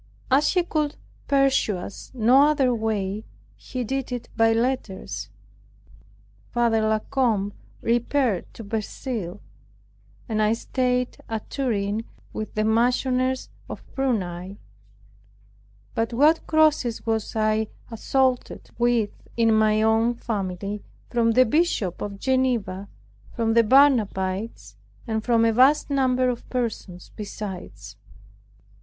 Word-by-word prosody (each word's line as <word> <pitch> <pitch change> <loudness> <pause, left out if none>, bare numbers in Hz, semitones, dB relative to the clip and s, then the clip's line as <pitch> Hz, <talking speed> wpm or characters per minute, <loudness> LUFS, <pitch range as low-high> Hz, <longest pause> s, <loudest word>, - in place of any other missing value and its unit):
As 275 +3 +4
he 360 - +4
could 305 -3 -1 0.3
pursue 275 -7 +2
us 180 +2 -8
no 255 +5 +5
other 275 -5 +2
way, 215 -2 -2 0.3
he 255 -1 -5
did 265 +2 -3
it 245 -1 -5
by 225 0 +4
letters. 230 -4 -2 1.2
Father 235 -2 +2
La 215 0 +2
Combe 215 -5 0 0.3
repaired 240 -3 0
to 225 - -8
Verceil, 215 -2 -4 0.9
and 215 -1 0
I 215 +1 +3
staid 250 +1 -1
at 225 -2 -5
Turin, 220 -5 -1 0.3
with 215 - -5
the 215 - +1
Marchioness 250 +3 +1 0.2
of - - -7
Prunai. 195 -8 -2 1.4
But 225 +1 -1
what 300 +7 +3
crosses 305 -7 +2
was 225 -1 -1
I 215 0 +1 0.2
assaulted 255 +2 -1
with 235 -3 +2 0.3
in 225 -1 +4
my 215 0 +3
own 225 +2 +3
family, 200 -3 -4 0.3
from 230 -1 +2
the 255 +2 +6
Bishop 225 - 0
of 200 -1 -4
Geneva, 240 -7 0 0.5
from 225 -1 +1
the 230 - +6
Barnabites, 220 -5 +2 0.3
and 220 -2 -2
from 230 -1 +3
a 225 - +3
vast 270 +5 +4
number 255 -2 +2
of 245 -1 -3
persons 220 -7 -4
besides! 180 - -7
230 Hz, 115 wpm, -24 LUFS, 215-255 Hz, 1.4 s, the